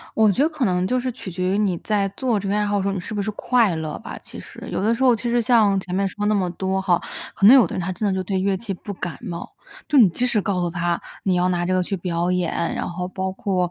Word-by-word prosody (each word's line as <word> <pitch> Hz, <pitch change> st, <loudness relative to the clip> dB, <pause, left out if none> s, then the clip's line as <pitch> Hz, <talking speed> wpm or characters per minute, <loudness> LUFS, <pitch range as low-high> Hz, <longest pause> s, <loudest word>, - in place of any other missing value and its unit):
我 220 Hz, -2 st, +5 dB
觉 225 Hz, -, 0 dB
得 300 Hz, -, +5 dB
可 310 Hz, -4 st, -3 dB
能 180 Hz, -4 st, +1 dB
就 255 Hz, -, +1 dB
是 255 Hz, 0 st, -1 dB
取 230 Hz, -5 st, -8 dB
决 180 Hz, +1 st, -2 dB
于 195 Hz, -, +1 dB
你 200 Hz, -4 st, +1 dB
在 205 Hz, -2 st, 0 dB
做 240 Hz, -4 st, 0 dB
这 200 Hz, -, -5 dB
个 200 Hz, -, 0 dB
爱 210 Hz, 0 st, +1 dB
好 205 Hz, 0 st, 0 dB
的 -, -, 0 dB
时 -, -, -1 dB
候， 200 Hz, -, 0 dB
你 195 Hz, -, -3 dB
是 215 Hz, -, -7 dB
不 205 Hz, -, -1 dB
是 200 Hz, -, -2 dB
快 225 Hz, -3 st, +2 dB
乐 155 Hz, -1 st, -4 dB
吧， -, -, -8 dB
其 -, -, -11 dB
实。 -, -, -10 dB
有 -, -, -1 dB
的 220 Hz, +3 st, +2 dB
时 260 Hz, -, -2 dB
候 255 Hz, -2 st, +6 dB
其 235 Hz, +2 st, -2 dB
实 240 Hz, 0 st, +2 dB
像 215 Hz, -4 st, +4 dB
前 180 Hz, -1 st, -7 dB
面 195 Hz, +1 st, +1 dB
说 205 Hz, +2 st, -4 dB
那 215 Hz, -, +3 dB
么 190 Hz, -3 st, +1 dB
多 190 Hz, +2 st, -1 dB
哈， 180 Hz, -2 st, +2 dB, 0.3 s
可 195 Hz, -, +2 dB
能 225 Hz, -, +10 dB
有 265 Hz, -4 st, +7 dB
的 -, -, -8 dB
人 -, -, -2 dB
他 180 Hz, +2 st, -2 dB
真 205 Hz, +3 st, -2 dB
的 195 Hz, -, +1 dB
就 185 Hz, -, -1 dB
对 190 Hz, +1 st, -1 dB
乐 195 Hz, +1 st, +1 dB
器 195 Hz, +1 st, -4 dB
不 200 Hz, +2 st, -7 dB
感 180 Hz, -2 st, -5 dB
冒， 175 Hz, -8 st, -7 dB, 0.4 s
就 295 Hz, -, +3 dB
你 235 Hz, -6 st, +8 dB
即 240 Hz, +8 st, -1 dB
使 235 Hz, -4 st, +1 dB
告 190 Hz, -2 st, -1 dB
诉 175 Hz, -, 0 dB
他， 170 Hz, 0 st, -1 dB, 0.2 s
你 190 Hz, -2 st, +2 dB
要 180 Hz, +1 st, +2 dB
拿 175 Hz, -1 st, 0 dB
这 185 Hz, -, 0 dB
个 185 Hz, 0 st, +2 dB
去 195 Hz, +2 st, -3 dB
表 175 Hz, 0 st, -1 dB
演， 180 Hz, -2 st, 0 dB, 0.2 s
然 -, -, -3 dB
后 180 Hz, +1 st, -4 dB
包 190 Hz, +1 st, -3 dB
括 185 Hz, -2 st, -1 dB
195 Hz, 335 characters per minute, -22 LUFS, 180-215 Hz, 0.4 s, 能